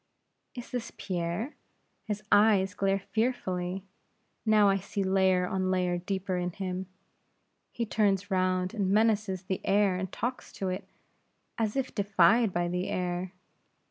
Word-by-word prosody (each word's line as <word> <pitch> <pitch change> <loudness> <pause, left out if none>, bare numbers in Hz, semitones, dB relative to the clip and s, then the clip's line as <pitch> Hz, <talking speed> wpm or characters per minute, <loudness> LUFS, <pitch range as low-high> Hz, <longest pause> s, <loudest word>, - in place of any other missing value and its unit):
"Is 245 -1 -8
this 245 -3 -4
Pierre? 180 - -3 0.5
His 210 -1 -3
eyes 205 -3 +5
glare 195 0 +1
fearfully; 190 -4 -2 0.6
now 215 -1 +6
I 195 0 +4
see 200 +1 -3
layer 190 -1 +3
on 185 0 -1
layer 180 -1 +1
deeper 190 0 -2
in 180 0 -1
him; 185 -1 -4 0.8
he 235 - -2
turns 205 -2 +1
round 185 0 +1
and 200 -5 0
menaces 210 -2 +2
the 190 0 -3
air 195 -1 +3
and 185 0 -4
talks 245 +3 -4
to 190 - -3
it, 185 - -4 0.7
as 215 -2 0
if 270 -1 -1
defied 200 +2 +4
by 175 -1 0
the 180 +2 -2
air. 180 0 -2
190 Hz, 140 wpm, -29 LUFS, 185-210 Hz, 0.8 s, now